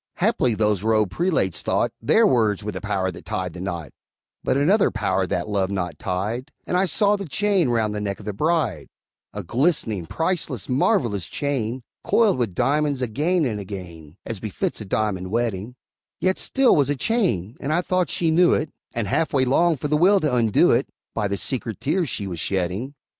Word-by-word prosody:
Haply 120 -3 +1
those 105 -3 +1
robed 110 -3 +2
prelates 160 - 0
thought - - 0
Their 220 - +4
words 110 - +2
were 105 - -3
the - - -6
power 95 -3 -1
that - - -11
tied 90 -2 -3
the 90 - -8
knot; 85 -6 -5 0.5
But 130 - +1
another 190 +9 +4
power 95 -4 0
that 90 +1 -2
love 100 -3 0
knot 90 -4 -3
tied, 105 +8 -3
And - - -2
I 185 +2 +3
saw 200 +4 +3
the 200 -3 -5
chain 195 -1 +1
round 110 -3 +1
the 105 - -3
neck 100 -1 -3
of 105 - -12
the 105 - -3
bride 160 - 0 0.4
A 105 - -6
glistening, 115 - 0
priceless, 160 - -2
marvelous 115 - +1
chain, 130 -4 -2 0.2
Coiled 215 - +3
with 110 -7 -1
diamonds 140 +1 +1
again 155 +9 +1
and 110 -5 -2
again, 90 -5 -9
As 115 -4 -4
befits 110 +1 -3
a - - -6
diamond 95 -2 -1
wedding; 115 0 -2 0.4
Yet 185 0 +1
still 270 -1 +3
'twas 140 -2 +3
a 145 - +1
chain, 135 - 0
and 140 - -3
I 170 +3 +2
thought 185 -1 0
she 165 -2 +1
knew 175 +2 +5
it, 155 - -2 0.2
And 115 -3 -1
half 160 - 0
way 130 -2 +3
longed 160 +4 +2
for 150 - -2
the 150 +1 +2
will 195 +5 +5
to 150 -4 0
undo 115 -4 +4
it, - - +2 0.3
By 105 -2 -1
the 100 0 -2
secret 115 -1 -3
tears 165 +1 0
she 100 - -3
was 90 -4 -5
shedding. 95 - -2
115 Hz, 195 wpm, -23 LUFS, 100-155 Hz, 0.5 s, knew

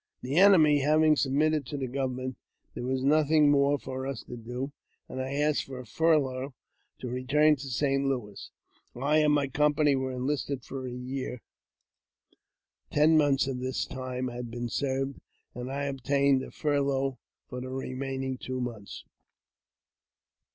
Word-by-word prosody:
« - - -54
The 135 +5 -2
enemy 170 -7 +7
having 155 +2 +4
submitted 150 +2 +1
to 145 - -4
the 135 - -2
government, 130 0 -3 0.4
there 120 - -5
was 130 0 -1
I - - +2
nothing 150 0 +4
more 140 0 +3
for 130 -1 -5
us 135 - -5
to - - -8
do, 125 +4 -5 0.4
and 130 - -5
I 130 +1 -4
asked 150 +1 +1
for 135 -1 -8
a 125 - -8
furlough 135 -1 +1 0.4
to 125 - -6
return 135 +5 +3
'^l 140 - -4
to 140 - -6
St. 135 +2 +1
Louis. 120 -7 -4 0.5
I 145 +5 +2
and 150 -1 +4
my 145 -1 +2
company 150 +1 +2
were 130 0 -2
enlisted 135 0 -2
for 130 -1 -6
a - - -5
year; 125 0 -5 1.5
ten 155 +2 +4
months 145 -3 +3
of 130 -2 -3
this 130 +1 -2
time 130 -1 -4
had 120 0 -6
been 120 +1 -4
served, 135 +1 -2 0.3
and 125 +2 -6
I 140 +1 -2
obtained 140 0 +2
a - - -7
furlough 140 -3 0 0.3
for 125 0 -6
the 130 - -6
remaining 130 0 -4
two 130 0 -4
months. 115 -5 -6
135 Hz, 165 wpm, -28 LUFS, 130-145 Hz, 1.5 s, enemy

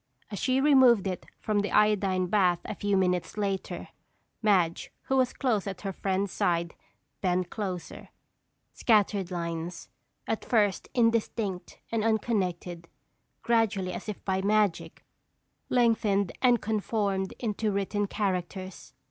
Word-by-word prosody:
As 205 - -4
she 260 0 +2
removed 260 -7 +5
it 185 -2 -4
from 210 -1 0
the 205 - -1
iodine 200 -3 +3
bath 180 -2 +3
a - - -4
few 205 -1 0
minutes 180 +1 0
later, 195 -2 -3 0.5
Madge, 185 -6 +2
who 265 - -1
was 260 -1 +3
close 230 -7 0
at 195 -2 -5
her 195 -2 -4
friend's 195 +1 -1
side, 170 -1 0 0.5
bent 180 -1 0
closer. 185 -5 -5 0.6
Scattered 205 -4 +2
lines, 170 -1 -5 0.4
at 225 - -2
first 205 -5 +1
indistinct 230 -5 0
and 225 -2 0
unconnected, 185 -6 -1 0.6
gradually 225 -5 +1
as - - -6
if 210 - -7
by 190 -1 0
magic, 205 -2 0 0.6
lengthened 220 -6 +2
and 245 -2 +4
conformed 205 -3 -1
into 215 -2 -1
written 200 +1 -1
characters. 190 -2 -4
200 Hz, 125 wpm, -28 LUFS, 185-220 Hz, 0.6 s, removed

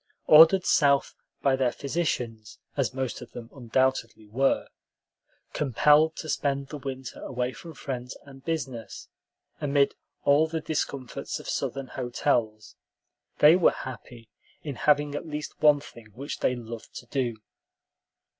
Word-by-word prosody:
Ordered 165 +4 +8
South 140 -2 +3 0.3
by 135 -1 +4
their 130 -2 +1
physicians, 125 -8 -3 0.2
as 135 -4 0
most 130 -1 -4
of 125 - -11
them 115 -1 -9
undoubtedly 125 -3 -1
were, 135 +6 +1 0.9
compelled 150 +3 +4
to 155 - -7
spend 140 -2 -1
the 150 - -6
winter 130 -1 -7
away 125 0 -3
from 165 +2 -11
friends 125 -2 -6
and 135 -1 -14
business, 135 -8 -5 0.5
amid 140 -1 +2 0.3
all 145 +3 +4
the 160 0 -3
discomforts 140 -4 -4
of - - -11
Southern 135 -1 -2
hotels, 120 -4 -1 0.6
they 150 +3 +7
were 180 - +5
happy 120 -2 -9 0.4
in 145 - -4
having 145 +2 +2
at 145 - -5
least 150 -1 -6
one 150 -1 +6
thing 115 -6 -13
which 140 +3 -6
they 125 - +1
loved 115 -1 -9
to - - -8
do. 120 -3 -2
135 Hz, 135 wpm, -27 LUFS, 120-150 Hz, 0.9 s, Ordered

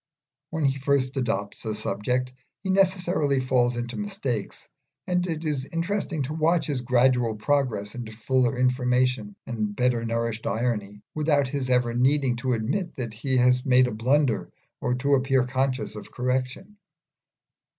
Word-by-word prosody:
When 160 -3 -1
he 135 0 +1
first 135 -1 +1
adopts 105 -6 -2
a 110 -2 -2
subject 125 +5 -2 0.3
he 190 - 0
necessarily 180 -7 +2
falls 125 -2 +1
into 120 0 -4
mistakes, 195 - -4 0.4
and 180 0 0
it 160 -1 -3
is 145 -4 -1
interesting 170 -2 -1
to 140 +4 -4
watch 160 +2 +2
his 140 -4 -2
gradual 125 -2 +2
progress 105 -4 0
into 120 -3 -6
fuller 125 +3 +1
information 125 -3 +1
and 110 -3 -3
better 125 -1 +1
nourished 115 -1 -2
irony, 105 -2 -2
without 145 -3 +2
his 135 -2 -2
ever 125 -2 +2
needing 130 +1 +2
to 130 +1 -1
admit 145 - -2
that 120 -4 -4
he 130 +4 -1
has 125 0 +4
made 130 -1 +5
a 125 - -2
blunder 125 +3 +1 0.3
or 125 0 0
to 140 +3 +1
appear 135 -1 +3
conscious 130 -1 -1
of 105 - -9
correction. 130 +11 -2
125 Hz, 150 wpm, -26 LUFS, 120-140 Hz, 0.4 s, made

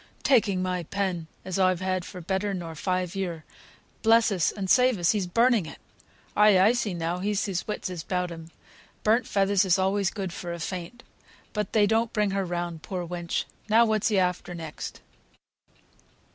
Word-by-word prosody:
"Taking 210 -8 +3
my 180 -1 -1
pen, 180 -1 -2 0.2
as 185 0 -3
I've 185 -2 +3
had 185 -1 -2 0.2
better 195 +2 -1
nor 170 -3 -6
five 180 +2 -2
year. 175 -5 -4 0.6
Bless 225 0 +5
us, 180 -5 +1
and 195 -2 -4
save 250 +2 +4
us! 175 -2 +3
he's 200 -4 -1
burning 230 -1 +3
it! - - -9 0.6
Ay, 210 -2 +6
I 200 +4 +6
see 230 -6 -1
now, 170 +1 -2
he's 205 +1 0
his 190 -4 -3
wits 210 - -3
about 180 0 -3
him; 165 -1 -9 0.5
burnt 225 +2 +3
feathers 200 0 +2
is 190 -1 +3
always 190 0 +1
good 195 -5 -5
for 175 -1 -5
a 170 - -6
faint. 180 +7 -6 0.5
But 210 -3 -3
they 215 -2 +5
don't 225 +2 +1
bring 210 -2 +1
her 195 0 -1
round, 175 -2 -4
poor 180 0 -4
wench! 175 -1 -3 0.2
Now 230 +2 +6
what's 215 -2 +1
he 210 -2 +1
after 180 -1 0
next? 160 -2 -7
190 Hz, 175 wpm, -26 LUFS, 175-210 Hz, 0.6 s, Ay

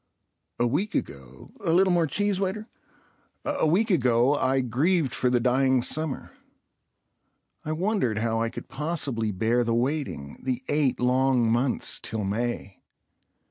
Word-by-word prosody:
A 120 - +2
week 150 - -1
ago—("A 65 - -5
little 185 +2 +4
more 170 -2 +2
cheese, 205 +4 0
waiter") 200 +3 -2 0.8
—a - - +1
week 205 +8 +2
ago 125 -4 +3
I 135 -2 +1
grieved 135 - +1
for 125 - +1
the 125 -1 +2
dying 130 +1 +2
summer. 155 0 -2 1.3
I 155 - -2
wondered 175 - 0
how 115 +1 0
I 115 - 0
could - - -9
possibly 135 -6 -2
bear 110 +5 +1
the 115 0 0
waiting 125 - -2
—the 130 -1 -3
eight 145 -3 +1
long 125 -2 +2
months 120 +2 0
till 110 -1 -4
May. 105 -1 -3
130 Hz, 140 wpm, -26 LUFS, 115-160 Hz, 1.3 s, little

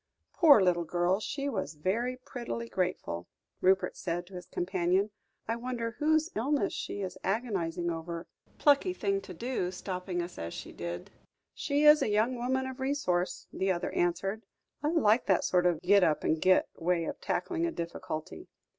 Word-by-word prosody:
"Poor 300 -9 +7
little 175 -2 +3
girl, 175 +3 +1
she 275 +5 -3
was 190 - -3
very 230 +11 -1
prettily 240 -2 -5
grateful," 175 - -2 0.3
Rupert 190 +1 +3
said 175 -1 -3
to 190 - -17
his 180 -1 -8
companion. 185 +3 0 0.4
"I 225 - 0
wonder 235 -1 -3
whose 315 +2 +2
illness 275 +6 +1
she 205 - -4
is 185 -2 -5
agonising 175 -7 -1
over. 165 +1 -5 0.3
Plucky 295 +6 +4
thing 195 - 0
to 185 - -9
do, 235 -3 -2
stopping 185 -1 -4
us 175 +1 -8
as 85 0 -5
she - - -7
did." 85 0 -6 0.4
"She 285 +1 0
is 300 0 +8
a - - +1
young 215 +4 +2
woman 260 +2 0
of 260 0 -6
resource," 185 -10 -1
the 190 0 +1
other 175 -1 -2
answered. 195 +5 0 0.4
"I 295 - +1
like 250 -9 +3
that 190 - +3
sort 180 -1 +3
of 170 -3 +1
'git 200 +1 +5
up 155 -3 +2
and 160 0 +1
git' 185 0 +4
way 170 0 +1
of - - -5
tackling 340 -1 -1
a - - -2
difficulty. 160 - -5
190 Hz, 170 wpm, -30 LUFS, 175-250 Hz, 0.4 s, is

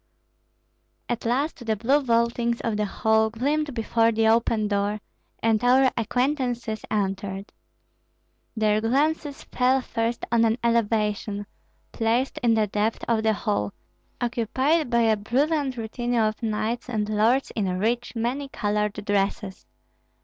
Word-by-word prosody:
At 240 -1 -3
last 265 +3 -1
the 220 -2 0
blue 260 +8 +2
vaultings 235 -1 +1
of 225 -2 -1
the 210 0 0
hall 220 +2 +2
gleamed 285 +5 -1
before 230 0 +2
the 220 0 +2
open 225 -1 +2
door, 205 +1 -1 0.4
and 225 -1 +2
our 255 +1 +5
acquaintances 245 -1 -1
entered. 195 -1 -2 1.1
Their 215 -1 +2
glances 285 +5 0
fell 255 +1 +2
first 230 -2 -2
on 235 -1 +4
an 225 0 +2
elevation, 210 -3 0 0.5
placed 235 +3 0
in 235 -2 +3
the 220 -1 +3
depth 210 +2 -1
of 230 -2 +2
the 220 0 +2
hall, 200 - -2 0.5
occupied 260 +5 0
by 235 -1 +3
a 225 -1 +4
brilliant 265 +5 0
retinue 240 +1 -1
of 215 +1 0
knights 225 +2 -2
and 215 -3 -1
lords 220 +5 +2
in 205 -3 0
rich, 235 +5 -1
many 250 +5 -2
colored 210 -3 -1
dresses. 200 -1 -1
230 Hz, 135 wpm, -25 LUFS, 215-245 Hz, 1.1 s, our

